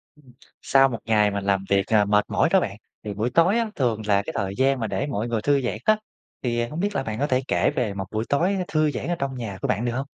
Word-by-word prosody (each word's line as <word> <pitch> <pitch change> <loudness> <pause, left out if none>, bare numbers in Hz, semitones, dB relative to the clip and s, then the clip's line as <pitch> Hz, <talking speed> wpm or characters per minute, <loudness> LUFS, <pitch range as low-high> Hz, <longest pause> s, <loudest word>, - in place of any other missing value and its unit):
Ừm. 140 -4 -21 0.3
Sau 135 0 +4
một 115 -3 -4
ngày 105 -2 +3
mà 100 0 -2
làm 95 0 0
việc, 100 -1 +2
ờ, 105 -2 +3
mệt 105 +1 +2
mỏi - - +2
đó 190 - +6
bạn, 100 - -4 0.3
thì 105 - -4
buổi 110 +4 -1
tối 170 - +3
á, 230 -2 0
thường 120 -5 0
là 100 -1 +3
cái - - -5
thời 95 0 -2
gian 135 +1 +2
mà 115 - -2
để 140 - -2
mọi 115 -5 -2
người 115 -2 -1
thư 140 +3 +2
giãn 120 -3 -2
á, 215 0 +4 0.4
thì 120 -2 0
hông 150 +7 -6
biết 205 +2 -1
là 135 - 0
bạn 110 -2 -4
có 145 - +1
thể 130 -2 +1
kể - - +2
về 115 -5 -1
một 95 -1 -4
buổi 110 +1 -2
tối 180 +8 +2
thư 155 -1 +1
giãn - - -5
ở 175 - 0
trong 135 -1 -2
nhà 110 -6 -5
của - - -1
bạn 110 +5 0
được 120 - 0
hông? 130 +3 -3
120 Hz, 290 wpm, -24 LUFS, 105-140 Hz, 0.4 s, đó